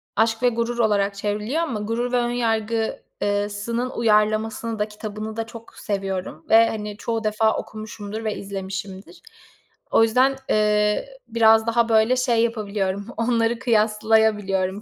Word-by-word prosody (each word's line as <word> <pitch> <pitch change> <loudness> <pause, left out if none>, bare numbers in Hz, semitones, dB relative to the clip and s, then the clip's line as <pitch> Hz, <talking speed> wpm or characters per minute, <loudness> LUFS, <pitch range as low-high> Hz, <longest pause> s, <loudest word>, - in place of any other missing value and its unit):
Aşk 225 +2 +1
ve 245 - +6
Gurur 235 0 -2
olarak 205 -3 +2
çevriliyor 210 +9 -2
ama 245 -10 -3
Gurur 230 +3 -2
ve 250 - +2
Önyargı, 230 -2 -1 0.2
ııı 205 0 0
sının 235 +5 -3
uyarlamasını 220 0 +1
da 210 - 0
kitabını 215 0 -7
da 225 0 -3
çok 230 0 -12
seviyorum 190 -5 -4
ve, 225 +1 +6
hani, 210 -1 -5
çoğu 225 0 -3
defa 215 +1 +1
okumuşumdur 215 0 -7
ve 215 -1 -2
izlemişimdir. 195 - -7 0.7
O 225 - +5
yüzden, 255 +4 +3
eee, 210 - +2 0.2
ı - - -19
biraz 225 0 +5
daha 235 0 +2
böyle 225 +3 +4
şey 240 -3 +2
yapabiliyorum, 205 -4 -2
onları 230 0 +1
kıyaslayabiliyorum 215 -4 +1
220 Hz, 140 wpm, -23 LUFS, 210-230 Hz, 0.7 s, ve